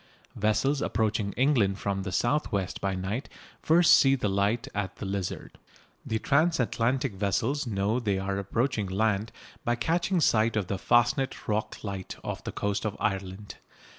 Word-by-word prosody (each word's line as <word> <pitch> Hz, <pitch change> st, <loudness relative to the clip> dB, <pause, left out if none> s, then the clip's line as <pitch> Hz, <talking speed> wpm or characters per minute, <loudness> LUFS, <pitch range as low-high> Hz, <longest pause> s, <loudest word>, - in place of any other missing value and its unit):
Vessels 120 Hz, +7 st, +1 dB
approaching 105 Hz, -2 st, 0 dB
England 120 Hz, -8 st, +2 dB
from 100 Hz, -2 st, -2 dB
the 95 Hz, -1 st, -4 dB
south 130 Hz, +11 st, 0 dB
west 100 Hz, -3 st, -2 dB
by 95 Hz, -1 st, -1 dB
night 95 Hz, +8 st, -3 dB, 0.3 s
first 170 Hz, +1 st, +5 dB
see 135 Hz, 0 st, +6 dB
the 125 Hz, -5 st, -1 dB
light 100 Hz, +4 st, 0 dB
at 100 Hz, -2 st, -3 dB
the -, -, -7 dB
Lizard. 95 Hz, -1 st, -4 dB, 0.4 s
The 110 Hz, -, -1 dB
transatlantic 135 Hz, -4 st, +1 dB
vessels 115 Hz, +8 st, -1 dB
know 105 Hz, +2 st, 0 dB
they 105 Hz, -5 st, 0 dB
are 95 Hz, +1 st, -2 dB
approaching 110 Hz, +2 st, -1 dB
land 105 Hz, +2 st, 0 dB, 0.3 s
by 120 Hz, -, +1 dB
catching 170 Hz, +8 st, 0 dB
sight 115 Hz, -6 st, +3 dB
of 105 Hz, -3 st, 0 dB
the 95 Hz, +1 st, -3 dB
Fastnet 120 Hz, +5 st, +1 dB
Rock 105 Hz, 0 st, -2 dB
light 100 Hz, -3 st, -5 dB
off -, -, -5 dB
the -, -, -4 dB
coast 100 Hz, 0 st, -2 dB
of 110 Hz, -2 st, -3 dB
Ireland. 95 Hz, 0 st, -3 dB
110 Hz, 160 wpm, -28 LUFS, 100-125 Hz, 0.4 s, see